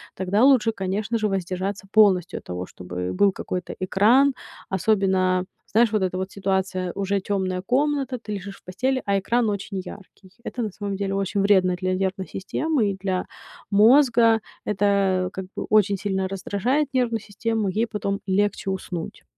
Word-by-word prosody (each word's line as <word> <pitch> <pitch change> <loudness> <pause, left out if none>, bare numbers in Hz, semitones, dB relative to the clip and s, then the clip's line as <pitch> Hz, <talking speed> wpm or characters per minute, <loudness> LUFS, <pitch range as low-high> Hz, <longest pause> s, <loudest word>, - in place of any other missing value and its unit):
тогда 190 +4 +1
лучше, 255 -4 +5
конечно 200 +3 -2
же, 215 - +1
воздержаться 195 +1 -3
полностью 195 -5 +4
от - - -20
того, 90 0 -5
чтобы 90 0 -6
был 200 - +4
какой-то 180 -1 -5
экран. 225 +9 +4 0.4
Особенно, 190 -2 +1 0.3
знаешь, 230 +1 +4
вот 215 -2 +1
эта 185 0 -1
вот 190 +1 -4
ситуация: 190 -2 -1
уже 200 0 -1
тёмная 185 -2 -2
комната, 270 +3 0
ты 215 -2 -6
лежишь 195 0 -6
в - - -25
постели, 260 +9 -1
а 200 -1 +2
экран 235 +4 +1
очень 200 -1 -4
яркий. 190 0 -12
Это 245 -1 -4
на 215 - -3
самом 200 +1 -4
деле 195 0 -2
очень 195 +1 -1
вредно 190 -2 +4
для 185 +1 -1
нервной 190 0 -2
системы 230 +2 -1
и 190 - -6
для 185 -1 -2 0.4
мозга. 230 +1 +5 0.2
Это, 195 -2 +1
как 190 - -5
бы, - - -4
очень 205 -2 +4
сильно 190 -1 -1
раздражает 200 +9 -1
нервную 235 -4 +1
систему, 220 +1 -2
ей 215 +5 0
потом 200 -2 -3
легче 195 0 0
уснуть. 180 -3 -6
200 Hz, 165 wpm, -24 LUFS, 190-220 Hz, 0.4 s, лучше